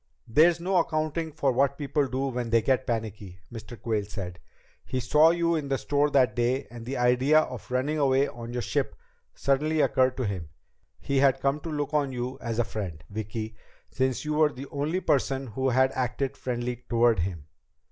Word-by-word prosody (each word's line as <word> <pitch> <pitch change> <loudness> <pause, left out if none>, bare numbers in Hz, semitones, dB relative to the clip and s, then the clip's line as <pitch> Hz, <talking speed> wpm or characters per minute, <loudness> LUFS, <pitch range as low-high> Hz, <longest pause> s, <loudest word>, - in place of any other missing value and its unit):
"There's 160 +8 +5
no 185 +2 +1
accounting 160 -1 0
for 145 -3 +1
what 140 +2 +1
people 145 -1 0
do 130 +1 -1
when 120 -2 -3
they 115 -1 +3
get 130 -1 +1
panicky," 105 -6 -4
Mr. 115 +1 -9
Quayle 110 -3 -1
said. 90 -4 -7 0.4
"He 130 - -3
saw 150 +6 +5
you 170 0 +2
in 155 -3 -1
the 135 -1 0
store 145 +2 +1
that 130 -6 +3
day 125 +3 +1
and 120 -1 -9
the 135 - -3
idea 125 +5 +4
of 125 -5 -7
running 135 +5 0
away 135 0 +3
on 120 0 -8
your 120 0 -3
ship - - -1 0.4
suddenly 150 +3 +1
occurred 130 -3 +3
to 130 - -1
him. 90 -6 -4 0.5
He 140 - -1
had 135 -1 +4
come 140 +2 +1
to 165 - -7
look 145 -1 -3
on 145 -3 +1
you 125 +1 -4
as 115 -1 -3
a 120 - +3
friend, 90 -9 -6
Vicki, 110 +1 -5 0.4
since 130 +1 -1
you 150 - -1
were 150 0 +4
the 135 +1 -8
only 150 +6 -1
person 135 -3 +1
who 130 +3 -1
had 130 +1 +3
acted 130 +2 -2
friendly 125 -1 -3
toward 115 -3 +3
him. 85 -4 -3
130 Hz, 195 wpm, -27 LUFS, 120-145 Hz, 0.5 s, There's